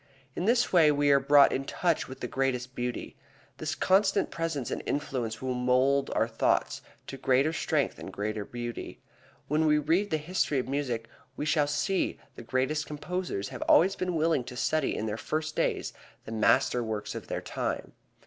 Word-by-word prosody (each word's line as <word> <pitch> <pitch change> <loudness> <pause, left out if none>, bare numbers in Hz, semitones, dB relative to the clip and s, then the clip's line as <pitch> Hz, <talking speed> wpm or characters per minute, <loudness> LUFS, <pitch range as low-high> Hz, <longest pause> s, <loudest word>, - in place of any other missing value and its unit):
In 180 - -2
this 235 0 +2
way 160 -4 +6
we 145 0 +3
are 140 - +6
brought 140 +1 +6
in 135 - -1
touch 170 +4 0
with 130 - -10
the 125 - -2
greatest 130 -1 -1
thought. 125 0 -2 0.6
This - - -3
constant 195 +1 +2
presence 165 -7 -3
and - - -2
influence 130 -6 -2
will 130 -1 -1
mold 130 +2 +2
our 110 - +2
thoughts 115 -1 0 0.2
to 135 - -7
greater 135 +4 +2
strength - - 0
and - - -7
greater 105 +1 -3
beauty. 120 +2 -6 0.5
When 155 +2 +2
we 150 0 +4
read 165 +7 +1
the 155 - +1
history 155 -2 -1
of 130 - -1
music, 130 -5 -2 0.3
we - - -2
shall 155 -2 +2
see 165 +7 0
that 140 - -27
the - - -10
greatest 130 +6 -1
composers 150 - -4
have - - -8
always 190 +4 +5
been 180 -2 -2
willing 160 -4 +2
to 125 - -8
study 155 +1 0
in 110 - -2
their 105 0 -3
first 155 +4 -3
days - - -1 0.3
the - - -8
master 125 +3 +3
works 110 -2 -4
of - - -7
their - - -3
time. - - -3
140 Hz, 185 wpm, -29 LUFS, 125-155 Hz, 0.6 s, way